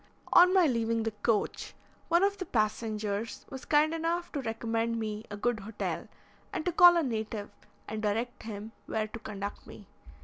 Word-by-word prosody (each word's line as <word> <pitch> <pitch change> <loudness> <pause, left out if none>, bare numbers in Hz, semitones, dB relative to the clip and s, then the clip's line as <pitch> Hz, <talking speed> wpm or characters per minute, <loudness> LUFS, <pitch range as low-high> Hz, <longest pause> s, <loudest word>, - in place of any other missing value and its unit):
On 360 +1 +8
my 375 -2 +5
leaving 230 -4 +1
the 225 - -1
coach, 225 -3 0 0.3
one 340 +2 +4
of 400 0 +1
the 370 - -3
passengers 215 +1 -1
was 265 -1 -7
kind 305 +1 +3
enough 335 +2 -1
to 285 - -2
recommend 230 0 -1
me 215 0 -4
a 205 - -6
good 235 +1 0
hotel, 205 +2 -4 0.4
and - - -3
to 355 - +2
call 350 0 +8
a 335 - +2
native 220 -4 -3 0.4
and 215 0 -4
direct 220 +3 -1
him 215 0 -7 0.2
where 220 -1 -1
to 225 - -8
conduct 205 -2 -6
me. 205 - -11
225 Hz, 175 wpm, -30 LUFS, 215-305 Hz, 0.4 s, On